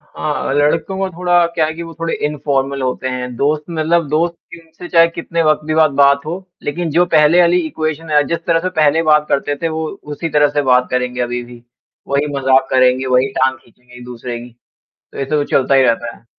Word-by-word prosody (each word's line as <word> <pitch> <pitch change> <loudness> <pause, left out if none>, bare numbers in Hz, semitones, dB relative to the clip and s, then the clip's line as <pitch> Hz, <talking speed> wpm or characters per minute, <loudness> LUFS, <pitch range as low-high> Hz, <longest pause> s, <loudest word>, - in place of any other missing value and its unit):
हाँ, 150 -1 -4
लड़कों 150 +6 +1
को 195 0 -1
थोड़ा 175 0 +2
क्या 160 - +2
है 155 - -3
कि 170 - -7
वो 165 0 -9
थोड़े 165 0 -1
इनफॉर्मल 140 -2 -2
होते 130 0 -2
हैं। 125 -1 -4
दोस्त 150 +3 0
मतलब 165 0 0
दोस्त 170 +3 0 0.2
इन 165 -1 -16
से 175 - -8
चाहे 165 0 +5
कितने 170 0 -3
वक़्त 155 -1 +1
भी 155 - -1
बाद 160 -1 +4
बात 140 0 +4
हो, 165 +3 -3 0.3
लेकिन 165 +3 -3
जो 170 +4 +3
पहले 155 +3 +5
वाली 175 +1 +4
इक्वेशन 155 0 -4
है 150 -1 +4
जिस 170 - -1
तरह 165 -1 +2
से 185 - -2
पहले 155 +2 +3
बात 150 -1 +3
करते 145 +1 -1
थे 165 - +1
वो 160 0 -3 0.3
उसी 165 +3 -4
तरह 150 -1 +3
से 145 - 0
बात 125 -2 +3
करेंगे, 125 0 -2
अभी 120 0 -2
भी। 120 0 -14 0.5
वही 140 +1 0
मज़ाक 135 0 +2
करेंगे, 130 0 +3
वही 130 +1 +2
टाँग 130 0 +1
खींचेंगे 125 0 -22
एक-दूसरे 125 0 -7
की। 120 +1 -11 0.6
तो - - -10
ऐसे 135 +2 -1
वो 145 - +1
चलता 135 -1 +1
ही 135 - +5
रहता 115 -3 0
है। - - -24
150 Hz, 220 wpm, -16 LUFS, 130-165 Hz, 0.6 s, चाहे